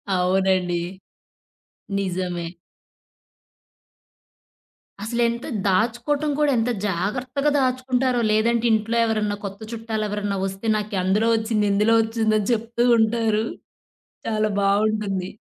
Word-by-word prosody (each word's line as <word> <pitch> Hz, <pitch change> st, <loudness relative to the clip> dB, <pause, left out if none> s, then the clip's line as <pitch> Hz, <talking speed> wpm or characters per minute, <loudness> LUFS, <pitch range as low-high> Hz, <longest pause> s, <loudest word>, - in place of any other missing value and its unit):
అవునండి. 180 Hz, -1 st, +1 dB, 1.2 s
నిజమే. 180 Hz, -2 st, -2 dB, 2.6 s
అసలెంత 235 Hz, +1 st, -1 dB, 0.2 s
దాచుకోవటం 240 Hz, +9 st, +1 dB
కూడా 295 Hz, -1 st, +3 dB
ఎంత 230 Hz, +2 st, +1 dB, 0.2 s
జాగ్రత్తగా 250 Hz, -, -1 dB
దాచుకుంటారో! 255 Hz, -1 st, +1 dB
లేదంటే 230 Hz, +2 st, +2 dB
ఇంట్లో 220 Hz, +2 st, +1 dB
ఎవరన్నా 215 Hz, -2 st, 0 dB
కొత్త 195 Hz, 0 st, -6 dB
చుట్టాలెవరన్నా 210 Hz, -3 st, -3 dB
వస్తే, 195 Hz, +3 st, -5 dB
నాకందులో 205 Hz, +1 st, 0 dB
ఒచ్చింది, 220 Hz, -1 st, 0 dB
ఇందులో 215 Hz, +3 st, +3 dB
ఒచ్చిందని 220 Hz, -1 st, 0 dB
చెప్తూ 235 Hz, +1 st, -1 dB
ఉంటారు. 220 Hz, -1 st, +1 dB, 0.8 s
చాలా 215 Hz, -1 st, +1 dB
బావుంటుంది. 200 Hz, -2 st, 0 dB
215 Hz, 85 wpm, -23 LUFS, 195-235 Hz, 2.6 s, కూడా